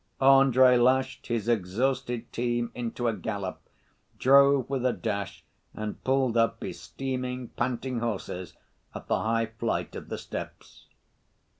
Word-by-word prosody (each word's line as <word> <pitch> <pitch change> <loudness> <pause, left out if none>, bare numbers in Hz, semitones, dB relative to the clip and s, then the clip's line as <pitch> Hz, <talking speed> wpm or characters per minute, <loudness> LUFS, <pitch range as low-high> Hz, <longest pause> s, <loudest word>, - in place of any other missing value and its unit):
Andrey 130 -2 +6
lashed 130 +2 +2
his 115 -2 -2
exhausted 120 +3 -1
team 120 0 -1
into 120 0 -3
a 115 - +2
gallop, 100 -4 -4 0.6
drove 140 0 +5
with 135 -2 -2
a 130 -1 +2
dash 100 -4 -4 0.3
and 110 -1 -5
pulled 130 -3 +1
up 115 0 +1
his - - -6
steaming, 125 -2 -4
panting 125 0 -2
horses 95 -5 -4 0.4
at - - -7
the - - +1
high 115 +1 +1
flight 115 - -2
of - - -8
steps. - - -8
120 Hz, 130 wpm, -27 LUFS, 115-130 Hz, 0.6 s, Andrey